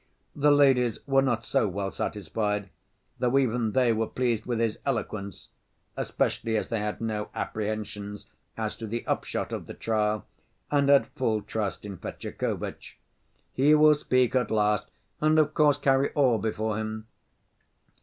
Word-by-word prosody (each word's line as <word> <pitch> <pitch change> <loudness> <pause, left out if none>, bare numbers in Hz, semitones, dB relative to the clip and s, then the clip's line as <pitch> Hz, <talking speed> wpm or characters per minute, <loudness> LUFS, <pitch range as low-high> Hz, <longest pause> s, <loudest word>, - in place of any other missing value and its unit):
The 150 0 +3
ladies 135 -5 +4
were 135 -1 +4
not 120 -4 0
so 110 - +2
well 95 0 -3
satisfied, 105 +1 -2 0.5
though 125 +2 +2
even 120 -4 +1
they 125 -3 +3
were 110 0 0
pleased 120 -3 -1
with 120 -2 -1
his 115 -2 0
eloquence, 110 -6 -4 0.5
especially 110 -1 -1
as - - -3
they 115 - -1
had 105 +1 -3
no 110 -2 -2
apprehensions 105 -1 -4 0.3
as 110 -1 -2
to 115 - -6
the 115 +2 -4
upshot - - -2
of - - -5
the - - -8
trial 105 -1 0 0.5
and 140 -1 +3
had 140 -1 +6
full 115 -7 -1
trust 105 -4 -3
in 100 -2 -6
Fetyukovitch. - - -5 0.6
"He 145 +4 +5
will 155 0 +7
speak 130 -4 +1
at 125 -3 +1
last 105 -2 +1 0.3
and 155 +1 +3
of 155 -1 +3
course 150 -3 +4
carry 135 -1 +2
all 130 -6 +3
before 110 0 -2
him." 110 0 -4
115 Hz, 155 wpm, -27 LUFS, 105-135 Hz, 0.6 s, will